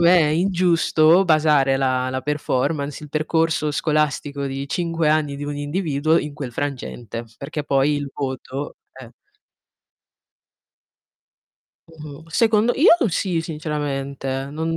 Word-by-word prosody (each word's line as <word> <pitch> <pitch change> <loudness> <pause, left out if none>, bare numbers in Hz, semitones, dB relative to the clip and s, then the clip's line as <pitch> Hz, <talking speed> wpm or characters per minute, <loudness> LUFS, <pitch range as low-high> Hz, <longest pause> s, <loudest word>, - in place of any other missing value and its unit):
me, 175 +1 +6
è 160 - +4
ingiusto 170 0 +3
basare 150 -4 +3
la 130 -1 0
la 130 0 -2
performance, 145 +1 -2
il 150 - -9
percorso 155 0 0
scolastico 145 -1 -1
di 135 +1 -4
5 165 -2 0
anni 150 -2 +1
di 145 - -5
un 145 0 -4
individuo 155 +1 0
in 150 - -4
quel 135 -5 -6
frangente, 120 -4 -5
perché 150 +2 -5
poi 140 +1 +2
il 145 -1 -4
voto 135 0 -5 0.2
Eh. 130 -3 -12 2.8
Mh-mh. 155 -2 -11
Secondo 220 +5 +3
io 305 - +6 0.2
sì, 175 -1 -1
sinceramente. 140 -4 -4
Non 160 +2 -2
150 Hz, 120 wpm, -21 LUFS, 140-165 Hz, 2.8 s, me